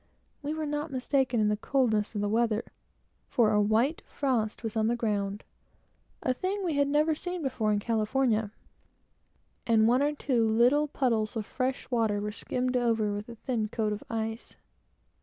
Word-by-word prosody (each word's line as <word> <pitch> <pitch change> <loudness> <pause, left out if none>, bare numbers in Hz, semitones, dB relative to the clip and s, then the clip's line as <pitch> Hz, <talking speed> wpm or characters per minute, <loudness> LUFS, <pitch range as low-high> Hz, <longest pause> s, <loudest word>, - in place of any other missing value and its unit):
We 295 +1 -3
were 315 -1 -2
not 295 +1 -2
mistaken 260 -2 0
in 210 - +3
the 210 - +2
coldness 220 -2 0
of 205 - -1
the 205 - 0
weather, 225 +1 +1 0.6
for 230 -4 +3
a 210 0 +3
white 225 +9 +2
frost 240 -6 -1
was 225 -1 -4
on 220 0 +2
the 235 - +2
ground, 205 -3 -2 0.8
a 255 - +2
thing 385 +8 -2
we 335 - 0
had 285 -1 +2
never 300 +2 +3
seen 355 +2 -4
before 225 -5 0
in 210 - +2
California, 220 0 +1 1.2
and 220 -1 +4
one 250 +3 +4
or 295 +1 +1
two 240 -6 +1
little 250 +7 +4
puddles 230 -6 0
of 220 -2 -2
fresh 255 +3 -2
water 220 -4 +1
were 210 +1 -3
skimmed 250 +4 -2
over 225 -4 +1
with 205 +3 -5
a 235 - -8
thin 225 -2 -2
coat 215 0 -1
of 210 - -6
ice. 225 0 -4
230 Hz, 175 wpm, -29 LUFS, 215-270 Hz, 1.2 s, and